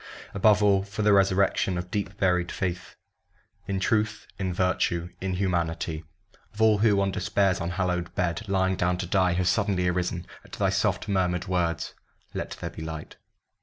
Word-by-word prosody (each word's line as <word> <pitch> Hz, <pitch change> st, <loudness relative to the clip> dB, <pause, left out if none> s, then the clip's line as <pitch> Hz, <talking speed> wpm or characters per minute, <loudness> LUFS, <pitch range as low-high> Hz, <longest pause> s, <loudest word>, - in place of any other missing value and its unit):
above 105 Hz, +1 st, +4 dB
all, 100 Hz, -2 st, +4 dB
For 100 Hz, +2 st, -4 dB
the 105 Hz, 0 st, +5 dB
resurrection 95 Hz, -1 st, +3 dB
of 90 Hz, +1 st, -5 dB
deep 100 Hz, -1 st, -3 dB
buried 90 Hz, -2 st, +1 dB
faith 90 Hz, -1 st, -4 dB, 0.7 s
In 95 Hz, -1 st, -1 dB
Truth 105 Hz, +2 st, 0 dB
in 95 Hz, -2 st, -1 dB
Virtue 90 Hz, -1 st, 0 dB
in 95 Hz, -1 st, -1 dB
Humanity 85 Hz, -4 st, -1 dB, 0.5 s
Of -, -, -11 dB
all 110 Hz, -2 st, +5 dB
who, 105 Hz, -2 st, +4 dB
on 100 Hz, 0 st, +1 dB
Despair's 95 Hz, -1 st, +1 dB
unhallowed 90 Hz, 0 st, -2 dB
bed 90 Hz, +5 st, -1 dB
Lying 95 Hz, -1 st, +2 dB
down 90 Hz, 0 st, +1 dB
to 90 Hz, -, -3 dB
die, 95 Hz, 0 st, +2 dB
have 90 Hz, 0 st, 0 dB
suddenly 90 Hz, 0 st, +1 dB
arisen 90 Hz, 0 st, -1 dB, 0.2 s
At -, -, -19 dB
thy -, -, +1 dB
soft -, -, 0 dB
murmured 90 Hz, -2 st, 0 dB
words, 85 Hz, -3 st, -1 dB, 0.4 s
"Let -, -, -3 dB
there -, -, -5 dB
be -, -, -9 dB
light!" 80 Hz, -1 st, -7 dB
95 Hz, 165 wpm, -26 LUFS, 90-100 Hz, 0.7 s, the